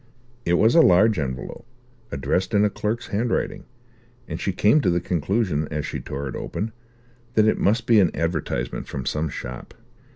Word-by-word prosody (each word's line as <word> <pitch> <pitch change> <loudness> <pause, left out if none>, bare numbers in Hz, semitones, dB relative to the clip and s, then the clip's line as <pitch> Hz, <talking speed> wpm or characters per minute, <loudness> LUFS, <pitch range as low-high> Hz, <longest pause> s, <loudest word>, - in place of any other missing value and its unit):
It 85 - +1
was 110 +6 +4
a 165 - +7
large 105 - +5
envelope, 65 - -5 0.4
addressed 90 - -1
in 100 +1 +5
a 105 - +1
clerk's 110 +4 -3
handwriting, 115 +4 -1 0.6
and - - -5
she 95 - 0
came 105 - +3
to 95 - +2
the 85 0 +2
conclusion, 90 -2 0
as 75 -1 -3
she - - -4
tore 70 +1 -5
it 65 - -6
open, 110 +2 -4 0.6
that 110 - +5
it - - +2
must 115 +4 +2
be 115 -3 +5
an 90 -4 +4
advertisement 75 -7 -2
from 65 -3 -5
some 75 +1 -1
shop. 60 -2 -8
90 Hz, 175 wpm, -23 LUFS, 75-110 Hz, 0.6 s, a